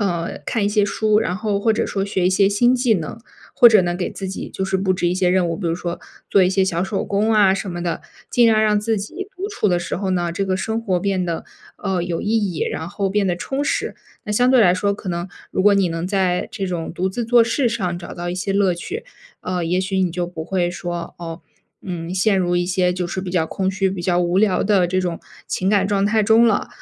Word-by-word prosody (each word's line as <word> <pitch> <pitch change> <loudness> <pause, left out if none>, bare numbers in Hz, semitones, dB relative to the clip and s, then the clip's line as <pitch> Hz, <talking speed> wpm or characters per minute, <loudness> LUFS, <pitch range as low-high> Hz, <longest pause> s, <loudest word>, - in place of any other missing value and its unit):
呃， 175 -4 -2
看 220 -3 0
一 205 - +2
些 210 0 +2
书， 210 +1 +2
然 185 -4 -1
后 205 -1 -1
或 225 - +2
者 215 - +1
说 195 - -2
学 190 -2 0
一 185 - +3
些 195 +1 +4
新 240 +5 +3
技 245 -3 +2
能， 165 +3 -4 0.4
或 240 - +8
者 215 -4 +5
呢 175 0 -1
给 180 0 -3
自 195 - -6
己 190 - -5
就 190 - -4
是 190 0 0
布 190 0 +1
置 175 - -1
一 175 - +2
些 185 -1 +2
任 180 0 +2
务， - - -1
比 175 +1 -4
如 165 - 0
说 175 0 -5 0.3
做 195 - +5
一 180 - +4
些 190 0 +2
小 175 -2 -1
手 190 +1 -2
工 205 +2 0
啊 205 -3 +5
什 195 0 -3
么 175 0 -5
的， 170 -2 -2 0.3
尽 240 -2 +4
量 220 -1 +4
让 210 -1 +3
自 225 +1 0
己 325 - -5
独 385 - -3
处 410 - 0
的 175 - +2
时 175 - -4
候 195 +1 -2
呢， 175 -2 0
这 195 +3 -2
个 185 -1 0
生 220 +4 -2
活 185 -5 0
变 190 0 0
得， 170 -1 -3 0.3
呃， 190 -3 -2
有 170 -1 -3
意 - - -3 0.3
义， - - -5
然 160 - -4
后 195 +1 -2
变 205 0 +1
得 175 -2 0
充 270 +9 -3
实。 - - -1 0.3
那 210 - -3
相 245 +4 +3
对 255 -3 +6
来 180 - +5
说， 200 +2 0
可 200 -2 -6
能 175 +1 -3 0.2
如 190 - 0
果 205 0 +6
你 195 -3 +2
能 165 +1 -3
在 185 -2 0
这 195 -3 -4
种 175 -3 -3
独 185 +2 -1
自 240 +6 -3
做 235 0 +5
事 240 +2 +1
上 185 -7 -2
找 170 - -9
到 175 0 -4
一 - - -3
些 185 +2 -3
乐 200 -2 +3
趣， 405 - -6 0.4
呃， 180 -1 -2
也 175 +2 0
许 190 +1 -1
你 185 -2 +1
就 175 +1 -2
不 170 -2 -7
会 175 0 0
说， 175 -1 -5
哦， 165 0 -7 0.4
嗯， 175 -1 -5
陷 195 +1 +2
入 175 -1 +1
一 175 - +1
些 180 0 +1
就 180 -1 -2
是 185 - -3
比 185 -1 -5
较 175 -3 +2
空 190 +3 -2
虚、 195 0 0
比 190 -1 -5
较 175 0 +1
无 175 +1 +1
聊 200 -3 +3
的 195 -4 +3
这 185 +1 0
种 175 -2 -2 0.3
情 185 - -1
感 200 -2 +3
状 200 -1 +1
态 215 +1 +2
中 225 +3 +5
了。 215 -3 +1
190 Hz, 285 characters per minute, -20 LUFS, 175-205 Hz, 0.4 s, 或